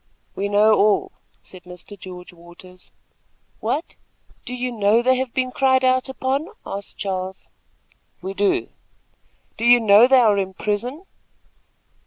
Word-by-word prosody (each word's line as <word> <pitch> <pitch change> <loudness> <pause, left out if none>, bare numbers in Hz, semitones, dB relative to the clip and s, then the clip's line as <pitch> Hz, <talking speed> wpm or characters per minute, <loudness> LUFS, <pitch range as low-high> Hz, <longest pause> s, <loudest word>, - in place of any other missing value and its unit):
"We 200 +1 -2
know 210 +2 +4
all," 205 0 +2 0.3
said 185 - -14
Mr. 180 +3 -11
George 180 -2 -11
Waters. 175 +2 -16 0.7
"What! 320 - -3 0.5
do 250 - -5
you 250 0 -3
know 220 +1 +2
they 260 +1 +3
have 260 -1 -3
been 255 0 -2
cried 260 0 +2
out 255 +1 +1
upon?" 265 +4 -2 0.2
asked 200 +1 -8
Charles. 190 -1 -5 0.7
"We 190 +2 -6
do." 200 0 0 0.9
"Do - - -6
you 240 +1 +6
know 215 +1 +6
they 265 0 +5
are 215 -4 +3
in 190 -1 -4
prison?" 240 - -3
210 Hz, 140 wpm, -21 LUFS, 190-255 Hz, 0.9 s, you